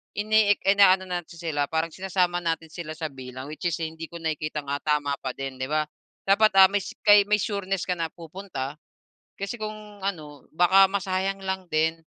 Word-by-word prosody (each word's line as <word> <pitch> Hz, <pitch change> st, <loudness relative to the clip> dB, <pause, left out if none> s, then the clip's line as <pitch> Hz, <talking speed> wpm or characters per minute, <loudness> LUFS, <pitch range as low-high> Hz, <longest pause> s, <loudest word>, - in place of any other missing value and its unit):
ini-ek 210 Hz, 0 st, +3 dB
inaano 195 Hz, -1 st, +6 dB
natin 175 Hz, -1 st, -5 dB
sila, 150 Hz, -4 st, -1 dB
parang 160 Hz, +1 st, -1 dB
sinasama 180 Hz, -2 st, 0 dB
natin 165 Hz, -1 st, -1 dB
sila 165 Hz, -3 st, -6 dB
sa 160 Hz, -, -4 dB
bilang. 130 Hz, 0 st, -8 dB
Which 155 Hz, -, -8 dB
is 165 Hz, -, -2 dB
hindi 160 Hz, 0 st, -5 dB
ko 170 Hz, -, -7 dB
nakikitang, 155 Hz, -2 st, -3 dB
ah, 145 Hz, -, -2 dB
tama 145 Hz, -2 st, +1 dB
pa 130 Hz, -, -3 dB
din, 135 Hz, -1 st, -5 dB
di 130 Hz, -, -1 dB
ba? 155 Hz, 0 st, +1 dB, 0.4 s
Dapat, 215 Hz, +2 st, +5 dB
ah, 190 Hz, -, +10 dB
mays 205 Hz, -1 st, -1 dB
kay 205 Hz, 0 st, +8 dB
may 210 Hz, -, +3 dB
sureness 195 Hz, -3 st, -2 dB
ka 180 Hz, -, +1 dB
na 165 Hz, -1 st, -2 dB
pupunta 165 Hz, -5 st, -6 dB, 0.7 s
kasi 200 Hz, +5 st, -4 dB
kung 215 Hz, -1 st, -7 dB
ano, 150 Hz, -8 st, -5 dB
baka 185 Hz, +3 st, +6 dB
masayang 195 Hz, 0 st, -1 dB
lang 190 Hz, -1 st, -3 dB
din. 160 Hz, +1 st, +1 dB
175 Hz, 185 wpm, -25 LUFS, 155-195 Hz, 0.7 s, ah